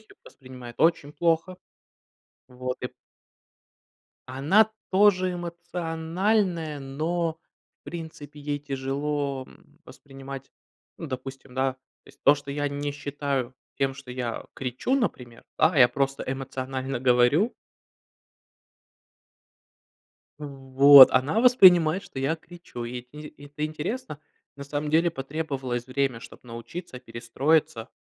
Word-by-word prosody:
сих 220 Hz, -, -26 dB
пор -, -, -15 dB
воспринимает 125 Hz, -3 st, -11 dB
очень 155 Hz, -3 st, +2 dB
плохо. 165 Hz, +3 st, 0 dB, 0.9 s
Вот, 125 Hz, 0 st, -5 dB
и -, -, -1 dB, 1.4 s
Она 165 Hz, +12 st, +3 dB, 0.2 s
тоже 185 Hz, -2 st, +4 dB
эмоциональная, 170 Hz, 0 st, -2 dB
но, 160 Hz, +4 st, -2 dB, 0.4 s
в -, -, -
принципе, 155 Hz, -3 st, -9 dB
ей 145 Hz, 0 st, -3 dB
тяжело, 140 Hz, 0 st, -3 dB
м, 150 Hz, +2 st, -21 dB
воспринимать, 135 Hz, -1 st, -10 dB, 0.5 s
ну, 165 Hz, -, -7 dB
допустим, 135 Hz, 0 st, -7 dB
да, 130 Hz, 0 st, 0 dB, 0.3 s
то -, -, -23 dB
есть -, -, -19 dB
то, 145 Hz, -, +7 dB
что 140 Hz, 0 st, -8 dB
я 145 Hz, +1 st, -1 dB
не 145 Hz, 0 st, -3 dB
считаю 140 Hz, -3 st, -3 dB, 0.2 s
тем, 135 Hz, -1 st, 0 dB
что 130 Hz, -2 st, -11 dB
я 125 Hz, -2 st, -4 dB
кричу, 130 Hz, -, -2 dB
например, 125 Hz, -, -3 dB
да, 160 Hz, +2 st, +3 dB
я 125 Hz, -2 st, +8 dB
просто 135 Hz, +2 st, -2 dB
эмоционально 130 Hz, -1 st, -4 dB
говорю. 130 Hz, -, +3 dB, 2.9 s
В 150 Hz, -, -6 dB
вот, 135 Hz, 0 st, +8 dB
она 135 Hz, +11 st, +2 dB
воспринимает, 185 Hz, -8 st, +6 dB
что 180 Hz, -9 st, -8 dB
я 140 Hz, +5 st, 0 dB
кричу. 165 Hz, -7 st, -10 dB
Ит 125 Hz, +1 st, -7 dB
из 150 Hz, +1 st, -10 dB
и 145 Hz, -1 st, -12 dB
это 145 Hz, +1 st, -4 dB
интересно. 155 Hz, -, -5 dB, 0.4 s
На 140 Hz, -, -8 dB
самом 145 Hz, +1 st, -3 dB
деле, 165 Hz, +3 st, +3 dB
потребовалось 135 Hz, -4 st, -4 dB
время, 130 Hz, -2 st, -1 dB
чтоб -, -, -13 dB
научиться, 125 Hz, +5 st, -8 dB
перестроиться. 120 Hz, +1 st, -1 dB
145 Hz, 120 wpm, -26 LUFS, 130-165 Hz, 2.9 s, я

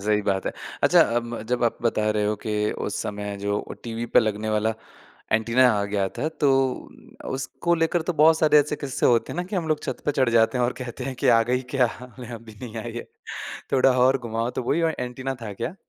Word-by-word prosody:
सही 105 Hz, 0 st, +2 dB
बात 95 Hz, -1 st, -1 dB
है। -, -, -1 dB, 0.3 s
अच्छा -, -, +6 dB, 0.2 s
अम 120 Hz, 0 st, -2 dB
जब 120 Hz, +2 st, -1 dB
आप 115 Hz, -, 0 dB
बता 110 Hz, -2 st, +1 dB
रहे 105 Hz, -1 st, 0 dB
हो 105 Hz, -, +1 dB
कि 105 Hz, -1 st, 0 dB
उस -, -, -4 dB
समय 105 Hz, -1 st, -4 dB
जो 100 Hz, 0 st, -1 dB
वो -, -, -6 dB
टीवी 115 Hz, 0 st, -4 dB
पे -, -, +8 dB
लगने 110 Hz, -1 st, -2 dB
वाला 110 Hz, +1 st, +1 dB, 0.6 s
एंटीना 115 Hz, +4 st, +4 dB
आ 100 Hz, -1 st, 0 dB
गया 100 Hz, -1 st, -1 dB
था 155 Hz, -, 0 dB
तो 145 Hz, -3 st, +4 dB, 0.8 s
उसको 135 Hz, +6 st, -1 dB
लेकर 165 Hz, +1 st, +1 dB
तो 175 Hz, +2 st, -1 dB
बहुत 160 Hz, +1 st, +5 dB
सारे 150 Hz, -1 st, +5 dB
ऐसे 150 Hz, +1 st, -2 dB
किस्से 140 Hz, -3 st, -1 dB
होते 120 Hz, -2 st, +2 dB
हैं -, -, -7 dB
ना, 175 Hz, -, 0 dB
कि 195 Hz, +2 st, -4 dB
हम 165 Hz, -3 st, -2 dB
लोग 155 Hz, -1 st, +1 dB
छत -, -, -4 dB
पे 145 Hz, -, +1 dB
चढ़ 130 Hz, -3 st, +2 dB
जाते 115 Hz, +2 st, +3 dB
हैं 125 Hz, -, +2 dB
और 120 Hz, -, 0 dB
कहते 125 Hz, +1 st, -6 dB
हैं 135 Hz, 0 st, -4 dB
कि -, -, 0 dB
आ 115 Hz, -2 st, +6 dB
गई 125 Hz, +1 st, +1 dB
क्या? 130 Hz, -2 st, +4 dB, 0.3 s
नहीं 125 Hz, -1 st, -8 dB
अभी 115 Hz, -1 st, -11 dB
नहीं 115 Hz, -2 st, -7 dB
आई 115 Hz, +1 st, -5 dB
है। 120 Hz, -, -4 dB, 0.7 s
थोड़ा 135 Hz, 0 st, +5 dB
और 130 Hz, +2 st, +4 dB
घुमाओ 115 Hz, -1 st, -2 dB
तो 125 Hz, -, -4 dB
वो -, -, 0 dB
ही 165 Hz, +3 st, +1 dB
औ 165 Hz, -, +3 dB
एंटीना 130 Hz, +2 st, -4 dB
था 105 Hz, -2 st, -5 dB
क्या? 115 Hz, -, -4 dB
120 Hz, 240 wpm, -24 LUFS, 110-135 Hz, 0.8 s, पे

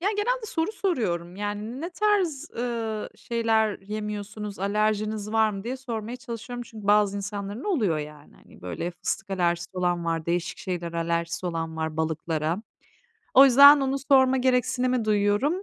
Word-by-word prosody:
Ya, 380 Hz, -, +1 dB
genelde 470 Hz, +2 st, 0 dB
soru 330 Hz, 0 st, -1 dB
soruyorum. 185 Hz, -, -2 dB
Yani, 210 Hz, +5 st, -4 dB
"Ne 340 Hz, +3 st, -4 dB
tarz, 365 Hz, -7 st, 0 dB
ııı, 230 Hz, -3 st, -3 dB
şeyler 225 Hz, -3 st, 0 dB
yemiyorsunuz, 210 Hz, 0 st, -5 dB
alerjiniz 215 Hz, +1 st, -1 dB
var 220 Hz, -1 st, +3 dB
mı?" 195 Hz, 0 st, -7 dB
diye 255 Hz, +2 st, -3 dB
sormaya 235 Hz, -2 st, -5 dB
çalışıyorum 245 Hz, 0 st, -7 dB
çünkü 220 Hz, -3 st, -10 dB
bazı 205 Hz, -1 st, +4 dB
insanların 205 Hz, +3 st, -5 dB
oluyor, 220 Hz, -, +1 dB
yani. 150 Hz, 0 st, -9 dB
Hani, -, -, -19 dB
böyle, 90 Hz, -, -4 dB
fıstık 200 Hz, +4 st, -4 dB
alerjisi 175 Hz, -1 st, 0 dB
olan 175 Hz, -2 st, 0 dB
var, 165 Hz, -1 st, -2 dB
değişik 175 Hz, +2 st, -1 dB
şeylere 175 Hz, -2 st, -4 dB
alerjisi 170 Hz, +1 st, -1 dB
olan 165 Hz, -2 st, -3 dB
var, 160 Hz, -1 st, -3 dB
balıklara. 160 Hz, +2 st, -1 dB, 0.7 s
O 270 Hz, -, +10 dB
yüzden 280 Hz, +2 st, +9 dB
onu 270 Hz, 0 st, 0 dB
sorma 265 Hz, -2 st, +5 dB
gereksinimi 250 Hz, -1 st, +1 dB
duyuyorum. 215 Hz, -, +1 dB
210 Hz, 150 wpm, -26 LUFS, 175-250 Hz, 0.7 s, O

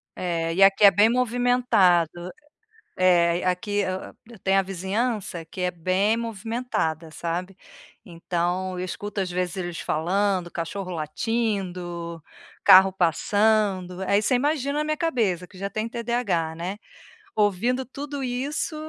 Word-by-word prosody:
É, 165 Hz, -2 st, -2 dB
e 190 Hz, -, 0 dB
aqui 195 Hz, +1 st, +5 dB
é 200 Hz, -, +10 dB
bem 205 Hz, +4 st, +4 dB
movimentado, 230 Hz, -9 st, +2 dB, 0.7 s
é, 175 Hz, -1 st, +3 dB
aqui 185 Hz, +3 st, -1 dB
eu 190 Hz, -2 st, -3 dB, 0.3 s
tenho 195 Hz, 0 st, +3 dB
a -, -, +4 dB
vizinhança 195 Hz, -1 st, -3 dB
que 175 Hz, +3 st, -8 dB
é 180 Hz, 0 st, 0 dB
bem 185 Hz, +6 st, +1 dB
movimentada, 225 Hz, -8 st, -3 dB
sabe. 175 Hz, +4 st, -4 dB, 0.5 s
Então 175 Hz, +1 st, -2 dB
eu 180 Hz, -, -3 dB
escuto 205 Hz, +2 st, -4 dB
às 180 Hz, -2 st, -3 dB
vezes 180 Hz, 0 st, -2 dB
eles 175 Hz, -3 st, -4 dB
falando, 185 Hz, +2 st, 0 dB
cachorro 180 Hz, +3 st, -5 dB
latindo, 175 Hz, -1 st, -3 dB, 0.4 s
carro 190 Hz, +1 st, +8 dB
passando, 190 Hz, +1 st, +1 dB
aí 200 Hz, +2 st, +2 dB
você 250 Hz, -, +2 dB
imagina 285 Hz, +2 st, 0 dB
a -, -, 0 dB
minha 305 Hz, 0 st, -1 dB
cabeça 215 Hz, -, 0 dB
que 185 Hz, -, -16 dB
já 195 Hz, +1 st, -4 dB
tem 215 Hz, +2 st, -3 dB
TDAH, 230 Hz, -9 st, -1 dB
né. 180 Hz, +5 st, -5 dB, 0.6 s
Ouvindo 220 Hz, +5 st, +1 dB
tudo 280 Hz, +1 st, -6 dB
isso 260 Hz, +6 st, -2 dB
190 Hz, 135 wpm, -24 LUFS, 175-225 Hz, 0.7 s, é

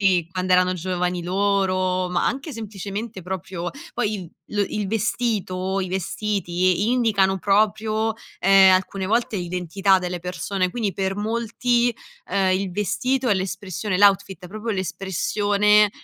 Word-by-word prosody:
sì 180 Hz, -4 st, +2 dB
quando 185 Hz, 0 st, -1 dB
erano 185 Hz, 0 st, +4 dB
giovani 180 Hz, 0 st, -2 dB
loro 185 Hz, -1 st, +1 dB
ma 180 Hz, -1 st, 0 dB
anche 275 Hz, +3 st, -2 dB
semplicemente 210 Hz, -1 st, -6 dB
proprio 180 Hz, -1 st, -5 dB, 0.2 s
poi 215 Hz, -3 st, -1 dB
il 180 Hz, -5 st, -7 dB, 0.2 s
lo 205 Hz, -1 st, +1 dB
il 210 Hz, -2 st, -3 dB
vestito 195 Hz, -3 st, -1 dB
i 185 Hz, -, -3 dB
vestiti, 185 Hz, 0 st, 0 dB
indicano 205 Hz, -6 st, +2 dB
proprio, 215 Hz, +3 st, +1 dB, 0.2 s
ehm, 195 Hz, -1 st, +7 dB
alcune 190 Hz, +1 st, 0 dB
volte 220 Hz, +1 st, 0 dB
l'identità 180 Hz, +2 st, +1 dB
delle 180 Hz, -1 st, -4 dB
persone, 185 Hz, +1 st, -2 dB
quindi 210 Hz, -5 st, -2 dB
per 195 Hz, 0 st, -1 dB
molti, 235 Hz, +2 st, 0 dB, 0.3 s
ehm, 190 Hz, -1 st, +1 dB
il 195 Hz, -2 st, -3 dB
vestito 210 Hz, +7 st, 0 dB
è 205 Hz, -, +4 dB
l'espressione 190 Hz, 0 st, -3 dB
l'outfit, 195 Hz, -3 st, +3 dB
è -, -, -8 dB
proprio 215 Hz, +3 st, -4 dB
l'espressione, 205 Hz, +2 st, +2 dB
195 Hz, 135 wpm, -23 LUFS, 185-210 Hz, 0.3 s, ehm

